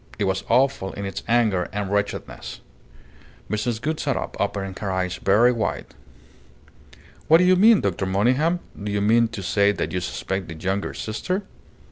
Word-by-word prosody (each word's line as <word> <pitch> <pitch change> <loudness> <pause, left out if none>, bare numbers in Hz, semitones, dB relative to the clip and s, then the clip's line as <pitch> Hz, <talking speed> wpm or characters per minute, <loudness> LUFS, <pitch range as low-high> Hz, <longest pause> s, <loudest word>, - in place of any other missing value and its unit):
It 105 - -1
was 95 -1 0
awful 130 -5 +2
in 100 - -5
its 95 - -4
anger 110 -7 +2
and 100 -1 -3
wretchedness." 100 0 -3 0.9
Mrs. 110 +1 -1
Gould 155 +5 -2
sat 140 -3 -1
up, - - -5
opening 100 -1 -2
her 100 - -3
eyes 90 -1 -1
very 110 +6 +4
wide. 115 -3 -3 1.3
"What 160 - +7
do 180 - +3
you 185 +1 +5
mean, 215 +3 +6
Dr. 95 0 -1
Monygham? 130 - +2 0.2
Do 105 - -3
you 100 - 0
mean 115 +3 +4
to 110 -3 -7
say 100 +3 +3
that - - -3
you 90 - -1
suspect 90 +7 -4
the 80 - -7
younger 95 +5 -2
sister?" 185 - -3
105 Hz, 170 wpm, -23 LUFS, 95-125 Hz, 1.3 s, What